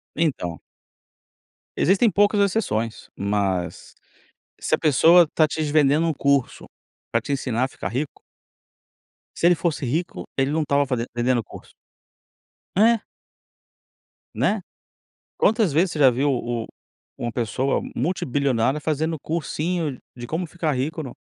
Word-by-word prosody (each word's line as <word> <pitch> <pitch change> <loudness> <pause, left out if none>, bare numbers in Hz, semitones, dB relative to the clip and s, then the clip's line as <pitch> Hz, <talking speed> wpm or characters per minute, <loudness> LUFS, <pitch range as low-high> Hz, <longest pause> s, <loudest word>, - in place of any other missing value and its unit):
Então 130 - -1 1.2
existem 200 +5 +4
poucas 205 +1 +3
exceções, 145 - -1
mas 100 -3 -2 0.7
se - - 0
a - - +2
pessoa 165 +4 +5
tá 155 - +4
te 155 - -4
s 150 -2 -1
vendendo 155 +2 +3
curso 140 -2 0 0.5
pra - - +2
te - - -9
ensinar 130 -3 0
a - - -1
ficar 90 - -6
rico 135 +8 -4 1.2
se - - -1
ele 175 - +5
fosse 160 -4 -2
rico, 160 +8 -3
ele 135 +1 +1
não 160 +1 +1
estava 145 -1 +2
faze 125 -3 -2
vendendo 120 0 +1
curso. - - -13 1.0
É. 225 +4 +5 1.4
Né, - - +1 0.8
quantas 215 -6 +2
vezes 170 +4 +2
você 155 - -5
já 135 -3 +7
viu 135 +4 +1
o 120 -2 -2 0.5
uma 120 - -3
pessoa 120 +3 -1
multibilionária 135 -3 0
fazendo 160 +2 -1
cursinho 160 -1 -2 0.2
de 120 -1 -7
como 165 +5 -3
ficar 165 -2 -2
rico 145 +5 -2
no 135 -5 -7
145 Hz, 130 wpm, -23 LUFS, 125-165 Hz, 1.4 s, já